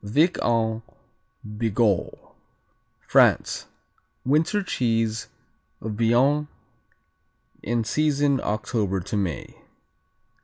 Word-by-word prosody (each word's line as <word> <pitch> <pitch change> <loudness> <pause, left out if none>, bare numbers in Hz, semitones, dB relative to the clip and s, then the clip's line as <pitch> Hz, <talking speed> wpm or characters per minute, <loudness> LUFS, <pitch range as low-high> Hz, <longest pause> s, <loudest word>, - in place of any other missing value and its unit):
Vic 150 - +2
en 110 -1 +1 0.7
Bigorre 105 -2 -1 0.7
France - - +3 0.6
Winter 160 +9 +2
cheese 115 - -1 0.5
of 110 - -5
Béarn 125 +7 +2 1.1
in 115 +1 -1
season 145 +1 +1
October 105 -2 -1
to 90 - -5
May. 95 -6 -3
115 Hz, 75 wpm, -24 LUFS, 105-140 Hz, 1.1 s, France